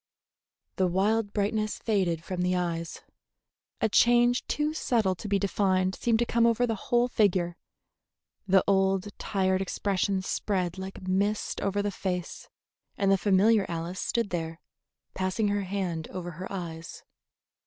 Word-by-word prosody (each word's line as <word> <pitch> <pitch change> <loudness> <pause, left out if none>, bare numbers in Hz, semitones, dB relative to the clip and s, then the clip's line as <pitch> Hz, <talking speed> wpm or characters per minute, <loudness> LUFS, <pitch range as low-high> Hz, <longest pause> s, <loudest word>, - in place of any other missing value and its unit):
The 185 - +3
wild 205 +4 +1
brightness 215 +1 -1
faded 185 -7 0
from 180 +1 -4
the 180 0 +1
eyes, 170 -2 -3 0.8
a 225 - +4
change 240 +3 +4
too 300 +1 0
subtle 230 -10 +1
to 185 +4 -8
be 200 0 +2
defined 190 -1 +1
seemed 230 +3 +1
to 240 - +1
come 235 0 +3
over 235 +1 +2
the 230 - -1 0.2
whole 240 0 +4
figure, 185 -7 +1 0.9
the 190 -1 +5
old 195 0 +2
tired 190 -1 0
expression 195 0 -1
spread 185 -2 -2
like 190 0 -7
mist 200 +3 0
over 200 +1 0
the 205 - -1
face, 180 -2 -4 0.5
and 195 -1 +2
the - - +6
familiar 200 +2 +3
Alice 170 +2 -4
stood 230 -4 -1
there, 165 -1 -3 0.5
passing 190 +3 0
her 205 0 0
hand 180 -4 -3
over 175 -1 -6
her 180 +4 -8
eyes. 165 -4 -7
195 Hz, 145 wpm, -28 LUFS, 180-210 Hz, 0.9 s, the